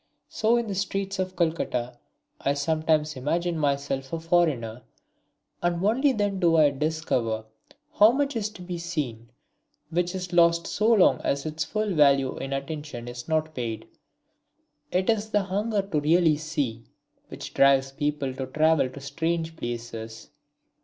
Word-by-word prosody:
So 225 +2 +2
in 235 - 0
the 205 - -4
streets 195 0 -2
of 185 0 -2
Calcutta 125 -8 -1 0.4
I 140 - 0
sometimes 155 0 +1
imagine 170 +6 -1
myself 140 -3 -1
a 165 - -2
foreigner, 155 -9 +1 0.8
and 175 +1 0
only 260 +7 +3
then 205 -5 -1
do 170 -3 +4
I 150 -2 +5
discover 135 -7 -1 0.5
how 215 +2 +7
much 275 +1 -1
is 215 -2 -1
to 180 - -10
be 175 -1 -5
seen, 140 -10 -4 0.6
which 175 +2 0
is 180 -1 -5
lost 170 -1 +4
so 220 +2 +1
long 210 -5 +5
as 140 +1 -1
its 155 0 -2
full 215 -2 -1
value 140 -4 +4
in 135 - -5
attention 140 -3 -5
is 120 0 -7
not 155 -1 0
paid. 115 -5 -4 1.0
It 185 +1 +1
is 220 -1 +1
the 210 -2 +2
hunger 205 +2 -1
to 195 -6 -1
really 160 +1 +3
see 145 -7 -3 0.4
which - - -8
drives 135 -1 +4
people 145 -1 -2
to 130 0 -5
travel 155 0 +2
to 130 - -10
strange 165 +3 -2
places. 115 -4 -6
160 Hz, 155 wpm, -26 LUFS, 135-180 Hz, 1.0 s, how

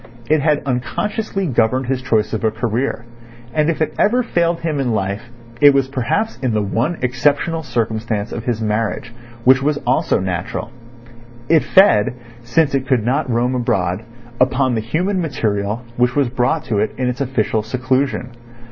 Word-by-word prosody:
It 155 -1 +3
had 150 0 +1
unconsciously 195 - -2
governed 130 -2 +1
his 130 0 -1
choice 110 -4 0
of 110 - -2
a 110 - +3
career, 115 +1 -2 0.5
and 155 0 +2
if 160 -1 +1
it - - -3
ever 245 +4 +3
failed 170 -6 0
him 155 -3 -1
in 125 -4 0
life 100 +4 -3 0.3
it 145 -1 +7
was 135 -1 +2
perhaps 135 - -1
in 130 -4 -1
the 105 - +2
one 115 - -1
exceptional 145 +6 +1
circumstance 115 -4 -2
of 115 - -5
his 115 -3 -1
marriage—which 120 +4 0
was 145 +1 +1
also - - +2
natural. 90 +5 -3 0.8
It 160 -1 +5
fed, 125 - +4 0.3
since 140 +5 +1
it 135 -1 0
could 125 -5 +1
not 130 +1 0
roam 120 +2 +1
abroad, 95 -6 0 0.4
upon 130 0 +2
the 110 - 0
human 180 - -1
material 110 -7 -2
which 125 +1 +2
was 140 -4 +2
brought 125 +5 0
to 105 -3 -1
it 105 - -1
in 130 - -1
its 125 +2 -2
official 115 -4 0
seclusion. 130 +2 -1
125 Hz, 165 wpm, -19 LUFS, 115-145 Hz, 0.8 s, it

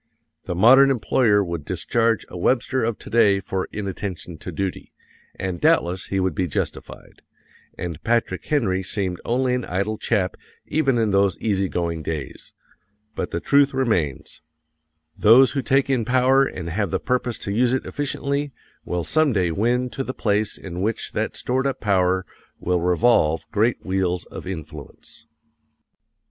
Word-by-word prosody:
The 90 - -3
modern 130 +9 +7
employer 115 -4 +2
would 85 -4 -4
discharge 115 +7 0
a - - -11
Webster 130 +7 +1
of 115 -1 -1
today 105 -4 +2
for 95 0 -4
inattention 95 -5 -5
to - - -7
duty, 95 -2 -4 0.4
and 95 -2 -4
doubtless 90 +2 +2
he 95 - -1
would 95 -2 0
be 90 +4 -1
justified, 70 - -6 0.6
and 85 -4 -6
Patrick 115 -5 0
Henry 110 -11 +1
seemed 95 -2 -3
only 125 +1 0
an 125 -1 -1
idle 100 +4 -2
chap 95 -5 0 0.3
even 140 -5 +1
in 110 -3 +1
those 100 0 +2
easy 100 -3 0
going 85 -2 -2
days; 80 -2 -6 0.6
but - - -3
the - - -3
truth 140 -1 +3
remains: 100 - -1 0.7
those 120 +5 +6
who 140 - -1
take 135 +1 +2
in 130 -4 +1
power 130 +3 +3
and 90 -9 -5
have 100 +2 -1
the - - -1
purpose 125 -2 -1
to 100 - -5
use 120 +3 +2
it 130 - -1
efficiently 145 0 -2 0.3
will 90 -1 -2
some 155 - +2
day 90 -5 +1
win 120 +7 +1
to 135 - -3
the 130 - -5
place 105 0 0
in 90 -1 -7
which 110 +3 -2
that - - -2
stored 130 +2 0
up 135 - -3
power 95 -2 +1 0.3
will 90 -1 0
revolve 90 -3 +3
great 115 +3 +1
wheels 95 -2 -1
of - - -8
influence. 85 -6 -9
105 Hz, 155 wpm, -22 LUFS, 90-125 Hz, 0.7 s, modern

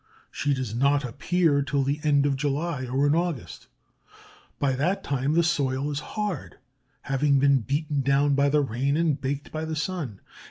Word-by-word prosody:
She 145 -1 0
does 130 -5 -4
not 140 +3 +2
appear 145 +4 +1
till 140 0 0
the 140 +3 -1
end 145 -2 +3
of 140 -1 +1
July 145 0 -2
or 135 +3 +1
in 145 - +3
August. 170 -6 -3 0.9
By 140 -2 +1
that 155 +10 0
time 140 +1 -1
the 170 +1 +4
soil 140 -3 0
is 145 - -2 0.2
hard, 205 -8 -3 0.5
having 140 +1 +2
been 140 0 +4
beaten 145 +4 -1
down 140 +2 +2
by 140 +1 +3
the 150 +1 +3
rain 135 +3 0
and 160 -4 +1
baked 140 +1 -3
by 155 0 -4
the 160 0 -3
sun. 150 - -3
140 Hz, 175 wpm, -26 LUFS, 135-150 Hz, 0.9 s, the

